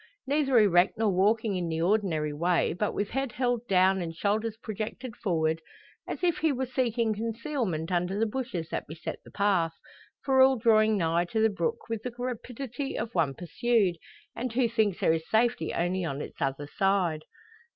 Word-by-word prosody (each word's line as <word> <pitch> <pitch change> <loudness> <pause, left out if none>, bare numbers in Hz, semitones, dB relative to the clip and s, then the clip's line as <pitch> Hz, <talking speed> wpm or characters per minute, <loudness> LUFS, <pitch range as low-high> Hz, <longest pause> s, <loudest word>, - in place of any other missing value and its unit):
Neither 275 -2 +2
erect 185 -5 +4
nor 220 -2 +2
walking 210 +3 +2
in 175 -2 -2
the 160 0 -2
ordinary 170 -6 +1
way, 170 +4 +1
but 205 +4 -2
with 205 0 -2
head 270 -1 -2
held 245 -2 -1
down 190 0 +4
and 165 -1 -5
shoulders 215 +4 -1
projected 220 +2 -6
forward, 160 -4 0 0.5
as - - -5
if 345 -3 +2
he 320 -1 +2
were 260 -1 -1
seeking 240 -3 0
concealment 225 - -3
under 180 +2 0
the 225 - +2
bushes 215 -8 -4
that - - -4
beset 160 +2 -6
the - - -14
path, 190 -5 +1 0.5
for 265 -1 +4
all 265 0 +6
drawing 215 -2 +4
nigh 170 -1 +1
to 220 +6 -2
the 220 0 +4
brook 170 -5 -2
with 225 -2 -3
the 250 - -4
rapidity 250 +2 -4
of 230 - -4
one 155 -6 +1
pursued, 195 0 +1 0.4
and 245 +1 -3
who 245 0 +3
thinks 220 -5 +1
there 160 - +3
is 160 0 -3
safety 225 -7 +2
only 180 +2 -1
on 140 -4 -3
its - - -8
other 135 +1 -1
side! 185 -2 +1
210 Hz, 185 wpm, -28 LUFS, 175-240 Hz, 0.5 s, all